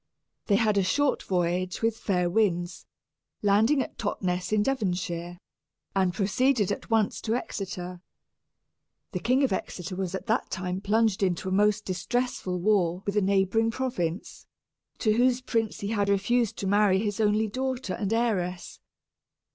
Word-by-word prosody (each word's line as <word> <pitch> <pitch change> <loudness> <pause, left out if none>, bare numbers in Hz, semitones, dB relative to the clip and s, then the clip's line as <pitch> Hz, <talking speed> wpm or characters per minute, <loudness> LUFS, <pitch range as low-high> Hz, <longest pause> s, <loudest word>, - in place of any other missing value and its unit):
They 205 - +4
had 215 -2 +3
a - - +2
short 285 +10 +1
voyage 180 +2 -1
with 225 -1 +2
fair 180 -5 0
winds, 175 -2 0 0.6
landing 220 +8 +4
at - - -12
Totness, 185 -3 -2
in 215 -1 +3
Devonshire, 180 -8 -2 0.6
and 190 -2 +2
proceeded 210 +4 +1
at - - -5
once 220 -2 +1
to 225 0 -1
Exeter. 180 -6 -5 1.1
The 180 - -3
King 255 +8 +2
of 265 - +2
Exeter 185 -1 -4
was 190 -1 -3
at - - -6
that 230 +1 0
time 185 0 -3
plunged 215 0 +2
into 185 -1 0
a - - -4
most 210 +2 +2
distressful 185 -1 -2
war 185 -2 +1
with 200 - -2
a 210 - +3
neighboring 200 +3 +2
province, 230 -8 -3 0.5
to 215 -3 +2
whose 245 +2 +3
prince 225 -4 -2
he 200 - -3
had 205 -2 0
refused 220 +3 +1
to - - -4
marry 200 -1 +4
his 205 0 -2
only 215 +1 +2
daughter 255 -2 -3
and 205 -2 -3
heiress. 190 -6 -1
200 Hz, 155 wpm, -27 LUFS, 185-225 Hz, 1.1 s, They